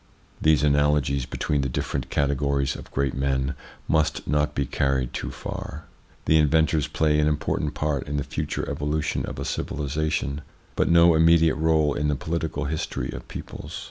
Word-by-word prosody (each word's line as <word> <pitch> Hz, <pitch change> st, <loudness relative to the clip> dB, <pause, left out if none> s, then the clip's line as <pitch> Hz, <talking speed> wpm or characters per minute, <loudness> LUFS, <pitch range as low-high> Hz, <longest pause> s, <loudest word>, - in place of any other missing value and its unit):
These 75 Hz, -1 st, +4 dB
analogies 70 Hz, -2 st, +2 dB
between 75 Hz, -3 st, -1 dB
the 70 Hz, -, -1 dB
different 65 Hz, +1 st, -3 dB
categories 70 Hz, -1 st, 0 dB
of -, -, -10 dB
great 70 Hz, -1 st, -1 dB
men 65 Hz, 0 st, 0 dB, 0.3 s
must 80 Hz, -1 st, +1 dB
not 75 Hz, +1 st, +1 dB
be 70 Hz, -, 0 dB
carried 65 Hz, -2 st, 0 dB
too -, -, -3 dB
far. 80 Hz, +1 st, -7 dB, 0.4 s
The 80 Hz, -, +5 dB
inventors 80 Hz, 0 st, +3 dB
play 75 Hz, -1 st, +1 dB
an 75 Hz, -, +3 dB
important 75 Hz, 0 st, -1 dB
part 75 Hz, -3 st, -1 dB
in 75 Hz, -, -2 dB
the 70 Hz, -, 0 dB
future -, -, -3 dB
evolution 75 Hz, +1 st, -1 dB
of -, -, -6 dB
a -, -, -4 dB
civilisation, 75 Hz, -1 st, -2 dB, 0.3 s
but -, -, +1 dB
no 85 Hz, 0 st, +6 dB
immediate 80 Hz, 0 st, +5 dB
role 80 Hz, -2 st, +2 dB
in 75 Hz, +1 st, -1 dB
the 75 Hz, -, +1 dB
political 80 Hz, +1 st, -3 dB
his 75 Hz, +2 st, -2 dB
tory -, -, -4 dB
of -, -, -8 dB
peoples. -, -, -7 dB
75 Hz, 170 wpm, -25 LUFS, 70-80 Hz, 0.4 s, no